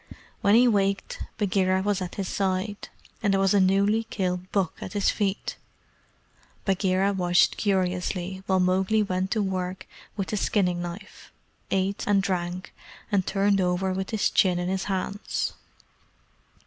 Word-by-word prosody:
When 200 +1 +5
he 245 +2 +6
waked, 200 -3 0 0.2
Bagheera 190 -2 +1
was 200 -1 0
at 180 - -5
his 195 -2 -3
side, 195 +2 -2 0.3
and 205 -3 +2
there 195 - +2
was 195 0 +3
a 200 - +5
newly 200 +4 +3
killed 185 -4 -3
buck 195 -5 +1
at 185 - -6
his 205 -1 +2
feet. 200 -2 -2 1.1
Bagheera 195 0 +2
watched 175 -2 +3
curiously 185 -1 -1
while 190 -1 +3
Mowgli 190 +4 +2
went 185 -1 -1
to 215 0 +1
work 185 -1 -3 0.3
with 195 -2 -3
his 210 - -1
skinning 180 -4 +1
knife, 175 +4 -8 0.4
ate 195 +1 0
and 200 -1 +3
drank, 180 -1 -3 0.4
and 195 -3 +1
turned 200 0 +2
over 185 +1 0
with 190 +1 -3
his 220 -2 +1
chin 180 -2 +3
in 175 0 -2
his 190 0 -1
hands. 195 +1 -2
190 Hz, 150 wpm, -26 LUFS, 185-200 Hz, 1.1 s, he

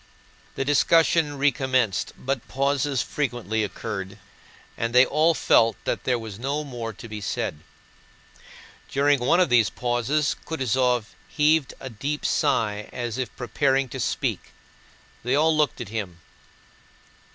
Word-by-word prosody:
The 135 - -2
discussion 150 +1 +3
recommenced, 130 -6 +1
but 130 -2 -3
pauses 140 -1 0
frequently 120 -6 -2
occurred 100 -2 -5 0.6
and 115 +1 -3
they 125 +1 +8
all 155 +4 +2
felt 115 -4 +4
that - - -3
there 125 -1 +2
was 110 -3 -8
no 140 +4 -2
more 120 -5 -5
to 115 +2 -11
be 105 -1 -7
said. 75 -5 -3 1.3
During 140 0 +2
one 125 +8 +3
of 180 -4 +3
these 115 -5 +4
pauses 125 +7 0
Kutúzov 125 -5 0
heaved 150 -1 +2
a 130 - -7
deep 140 +7 -4
sigh 105 -8 0
as 120 0 -4
if 125 -4 -4
preparing 135 +2 +1
to 130 - -6
speak. - - -2 0.7
They 125 +3 +1
all 155 +2 +3
looked 150 -3 +1
at 120 -5 -6
him. 100 -6 -5
130 Hz, 135 wpm, -24 LUFS, 115-145 Hz, 1.3 s, they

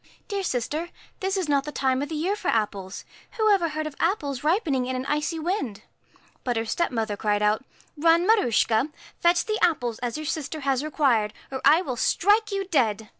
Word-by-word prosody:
' - - -34
Dear 400 -2 -1
sister, 305 +2 -2 0.3
this 385 +1 -1
is 370 -4 -1
not 280 -2 +2
the 300 - -6
time 265 -2 0
of 290 - -3
the 320 - -4
year 355 +7 0
for 385 - -6
apples. 200 -4 -1 0.3
Who 435 -2 +3
ever 345 -4 +2
heard 310 0 -3
of 305 -2 -6
apples 285 - -1
ripening 300 - +1
in 260 - -2
an 255 +1 -3
icy 300 +3 -1
wind? 310 - -3 0.3
' - - -32
But 245 -2 -1
her 225 - -1
stepmother 225 -6 -1
cried 210 0 0
put, 210 +4 +2 0.2
' - - -36
Run, 330 +3 +4
Maruschka, 255 - +3 0.3
fetch 345 +1 +3
the 430 -1 -1
apples 245 -9 +1
as 245 +2 -3
your 310 - -5
sister 310 +1 -3
has 270 -1 0
required, 255 -9 +1 0.2
or 265 -1 -4
I 330 +4 +6
will 255 -7 -4
strike 420 - +2
you 395 -1 -1
dead.' 225 - 0
295 Hz, 210 wpm, -25 LUFS, 240-345 Hz, 0.3 s, I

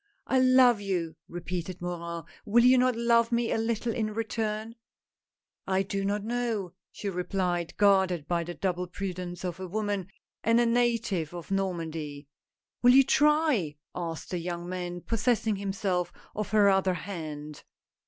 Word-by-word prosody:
"I 260 - +2
love 255 -3 +6
you," 175 -5 -2
repeated 175 +1 -5
Morin, 170 -1 -4 0.2
"will 235 +2 +4
you 255 +1 +7
not 255 -1 +3
love 235 0 +3
me 235 -1 +1
a - - +1
little 230 0 -1
in 215 -2 -2
return? 220 0 -2 0.3
" - - -65
" - - -65
I 190 0 +2
do 195 +1 -3
not 200 +1 -1
know," 225 -5 -2 0.2
she 205 - -6
replied, 180 -2 -2
guarded 190 -6 +3
by 170 -1 0
the 175 +1 -6
double 180 -1 -1
prudence 180 -1 -5
of 175 -1 -4
a 185 - -5
woman 205 -1 -2 0.4
and 230 +1 +4
a 240 - +4
native 230 -8 +1
of 175 +2 -8
Normandy. 165 -6 -3 0.3
" - - -65
Will 245 0 +7
you 270 - +8
try? 290 - +3
" - - -62
asked 165 -2 -5
the 180 - -1
young 175 0 -4
man, 175 -1 -4
possessing 225 -1 +1
himself 195 -2 -1 0.2
of 210 -2 -3
her 210 -2 +5
other 190 -1 +3
hand. 155 -4 -6
195 Hz, 165 wpm, -28 LUFS, 175-230 Hz, 0.4 s, you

